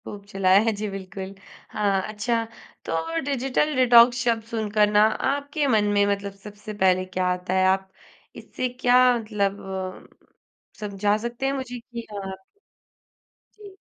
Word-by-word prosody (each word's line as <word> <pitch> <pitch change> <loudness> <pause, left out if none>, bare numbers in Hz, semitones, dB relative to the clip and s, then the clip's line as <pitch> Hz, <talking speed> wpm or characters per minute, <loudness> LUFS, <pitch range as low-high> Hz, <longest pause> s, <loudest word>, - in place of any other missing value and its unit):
खूब 200 -1 -9
चलाया 195 -2 +3
है - - +4
जी, 210 +1 -4
बिल्कुल। 195 0 -7 0.4
अ, - - -10 0.3
अच्छा 225 +2 -1 0.4
तो 165 0 -2
डिजिटल 280 +2 0
डिटॉक्स 245 -1 +6
शब्द 230 -2 +1
सुनकर 210 -1 +2
ना 210 0 +5 0.3
आपके 285 +1 -2
मन 220 -5 +3
में 200 - +4
मतलब 200 0 -2
सबसे 210 +1 -9
पहले 185 0 +3
क्या 185 0 -2
आता 180 0 -4
है? 185 0 +3
आप 190 0 +1 0.4
इससे 255 - -4
क्या 245 0 +5 0.2
मतलब 205 -3 -2
अ, 190 -1 -8 0.5
समझा 205 0 0
सकते 240 +3 -5
हैं 270 - +1
मुझे 255 -2 -5
कि 235 0 -8 0.2
अ 195 -1 -5 1.3
जी। 405 -2 -13
210 Hz, 145 wpm, -24 LUFS, 195-240 Hz, 1.3 s, डिटॉक्स